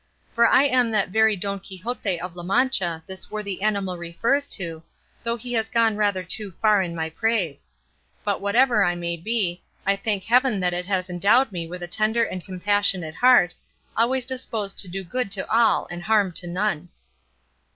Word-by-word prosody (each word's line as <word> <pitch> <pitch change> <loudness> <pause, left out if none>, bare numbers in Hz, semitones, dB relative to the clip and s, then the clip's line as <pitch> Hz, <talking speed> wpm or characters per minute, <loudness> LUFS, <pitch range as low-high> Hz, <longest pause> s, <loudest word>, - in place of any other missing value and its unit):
For 235 0 +5
I 270 - +5
am 255 -4 +3
that 215 -4 +1
very 220 +2 +3
Don 200 +1 -3
Quixote 195 0 -4
of 180 0 -7
La 175 - -7
Mancha 180 -4 +1
this 190 0 -7
worthy 200 -3 -4
animal 200 -4 -1
refers 230 +12 0
to, 165 - -4 0.4
though 235 0 -1
he 245 +2 -7
has 225 -1 0
gone 230 -2 +2
rather 205 -3 0
too 190 +1 -3
far 215 -3 +4
in 170 -2 -4
my 160 -1 -2
praise; 180 - -1 0.5
but 205 -2 -1
whatever 230 +2 +3
I 175 -1 +1
may 170 0 -3
be, 180 -1 -1 0.2
I 195 +1 +3
thank 200 -1 -1
heaven 245 -1 +3
that 180 -1 0
it 180 0 -4
has 185 -2 -1
endowed 205 +8 +3
me 170 -3 -4
with 180 +1 -7
a - - -5
tender 215 +5 +1
and 185 -5 -4
compassionate 190 -3 0
heart, 245 -5 +5 0.4
always 245 +2 +1
disposed 230 -6 -3
to 195 - 0
do 190 +2 -5
good 245 +5 -3
to 195 - -3
all 230 +1 +3
and 175 0 -6
harm 205 0 +2
to 175 +1 -5
none." 180 -2 -2
200 Hz, 185 wpm, -23 LUFS, 180-225 Hz, 0.5 s, For